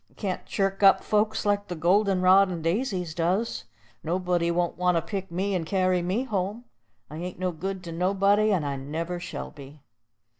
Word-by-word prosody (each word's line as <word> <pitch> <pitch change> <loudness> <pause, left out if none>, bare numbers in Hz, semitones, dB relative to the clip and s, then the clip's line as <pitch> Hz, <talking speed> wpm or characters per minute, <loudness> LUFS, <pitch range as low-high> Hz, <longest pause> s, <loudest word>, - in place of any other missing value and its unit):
I - - -28
can't 190 -4 -3
chirk 195 0 -1
up 195 -1 +6
folks 210 0 0
like 205 0 +1
the 180 - -4
golden 185 +3 +2
rod 190 +1 +6
and 170 -3 -5
daisies 180 -2 -1
does. 180 - -1 0.4
Nobody 175 0 0
won't 175 0 0
want 180 -1 +2
to - - +1
pick 190 +2 -5
me 190 +4 -1
and 180 -3 0
carry 185 +1 +1
me 185 +8 -1
home. 210 -1 -3 0.5
I 155 - -7
ain't 180 +2 -6
no 185 0 -1
good 185 +3 -5
to 170 - -7
anybody, 200 +5 +2
and 175 -7 +1
I 140 -1 -2
never 165 +6 -4
shall - - -6
be." 140 +1 -13
185 Hz, 190 wpm, -26 LUFS, 170-195 Hz, 0.5 s, up